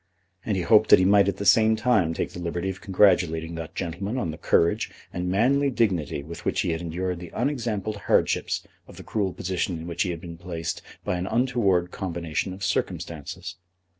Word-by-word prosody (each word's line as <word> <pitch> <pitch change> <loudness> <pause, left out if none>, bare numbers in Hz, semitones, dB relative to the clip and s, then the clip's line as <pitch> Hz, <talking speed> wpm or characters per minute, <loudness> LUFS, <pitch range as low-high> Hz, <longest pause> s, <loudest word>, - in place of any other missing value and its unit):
And 105 -3 -1
he 90 - -1
hoped 110 +4 +5
that - - +9
he 95 - +3
might 100 0 +5
at 100 - 0
the 100 - -4
same 110 +3 +5
time 110 -8 +2
take - - -2
the - - -8
liberty 85 +2 -2
of 95 -1 -11
congratulating 90 -5 +3
that 80 -1 -7
gentleman 100 +8 -3
on 85 -10 -1
the 80 - -8
courage 85 - +2 0.2
and 90 0 -2
manly 135 +9 +3
dignity 95 - 0
with 85 +3 -9
which - - 0
he - - 0
had 80 +1 -2
endured 90 +1 -3
the 85 -1 -8
unexampled 115 -6 -1
hardships 100 - +1 0.2
of - - -14
the - - -9
cruel 100 -4 -1
position 90 0 -2
in 80 - -7
which 85 -1 -3
he 95 - +1
had 85 -2 -3
been 85 0 -9
placed 85 -2 -4 0.2
by 90 - 0
an 90 +2 -3
untoward 110 -7 +1
combination 85 -1 -3
of 95 +1 -8
circumstances. 80 -3 -3
90 Hz, 200 wpm, -25 LUFS, 85-105 Hz, 0.2 s, that